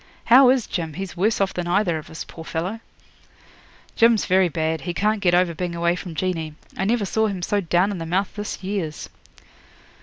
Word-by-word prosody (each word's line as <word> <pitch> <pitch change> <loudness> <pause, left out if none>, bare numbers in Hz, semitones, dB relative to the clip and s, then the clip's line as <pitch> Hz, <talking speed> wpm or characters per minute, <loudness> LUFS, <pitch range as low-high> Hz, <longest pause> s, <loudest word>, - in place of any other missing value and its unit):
How 250 +2 +7
is 255 -3 +3
Jim? 165 -4 -4
He's 190 -1 -6
worse 215 +6 +1
off 195 -1 +1
than 175 -1 -3
either 175 -3 +1
of 155 - -12
us, 160 - -6
poor 165 - -11
fellow.' 175 +7 -3 1.2
'Jim's 230 -1 +4
very 185 -1 +3
bad. 160 0 -1
He 175 -1 -4
can't 210 +2 +1
get 175 -3 +3
over 180 -1 +2
being 175 +1 -4
away 170 +1 +1
from 175 -2 -7
Jeanie. 160 -3 -2 0.2
I 190 - -1
never 220 0 +1
saw 220 +3 +1
him 190 -4 -4
so 205 +3 0
down 180 +3 +2
in 195 - -4
the 165 - -5
mouth 185 +4 0
this 205 -2 -5
years.' 185 -6 -4
185 Hz, 205 wpm, -23 LUFS, 170-205 Hz, 1.2 s, How